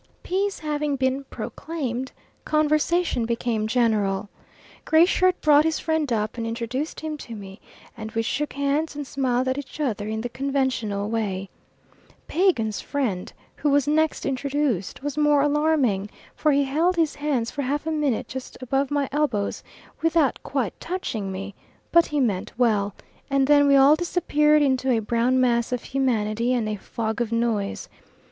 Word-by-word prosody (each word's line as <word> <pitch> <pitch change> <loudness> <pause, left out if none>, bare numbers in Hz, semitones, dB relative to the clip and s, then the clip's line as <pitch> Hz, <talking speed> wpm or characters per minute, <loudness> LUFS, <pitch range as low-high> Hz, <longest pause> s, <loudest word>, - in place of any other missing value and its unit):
Peace 390 +2 -1
having 300 -2 -1
been 265 +1 0
proclaimed, 265 -7 -5 0.3
conversation 305 -1 +1
became 230 -2 -1
general. 210 -4 +1 0.5
Gray 320 +2 +5
Shirt 370 0 +2
brought 300 -1 +6
his 320 0 0
friend 315 -4 -1
up 215 +1 -1
and 230 - -2
introduced 240 +6 -3
him 310 -1 -4
to 235 -5 -8
me, 195 -1 -10 0.3
and 220 -1 -7
we 225 - 0
shook 295 +6 -2
hands 280 +3 -1
and 290 0 -4
smiled 260 -2 0
at 260 +2 0
each 285 +2 -9
other 220 -8 -1
in 220 0 -2
the 245 - -2
conventional 255 -6 -1
way. 200 -4 -2 0.8
Pagan's 275 - +1
friend, 235 -11 -2 0.3
who 295 - 0
was 285 0 +3
next 315 +1 +1
introduced, 270 -6 -1
was 290 0 -3
more 295 -1 +4
alarming, 290 -9 +1 0.3
for 305 - +2
he 280 0 +3
held 320 +7 +1
his 325 -3 +1
hands 285 -6 -1
for 285 - -3
half 285 +3 -2
a 320 - -1
minute 295 -7 0
just 260 -1 -7
above 270 +2 0
my 285 -1 0
elbows 265 -9 -1 0.4
without 325 -4 +2
quite 260 -8 -2
touching 230 - -3
me, 195 +2 -6 0.4
but 340 0 +5
he 295 - -1
meant 210 -8 0
well; 210 -5 +2 0.3
and 275 -1 +3
then 285 0 +5
we 280 - +5
all 275 +2 +7
disappeared 305 -3 +2
into 265 -1 +1
a 245 - +3
brown 235 +4 +1
mass 235 -2 +2
of 250 -2 -2
humanity 235 -3 0
and 230 -3 0
a 215 - -1
fog 220 +2 -4
of 235 -1 -1
noise. 230 -4 -1
265 Hz, 165 wpm, -24 LUFS, 225-295 Hz, 0.8 s, all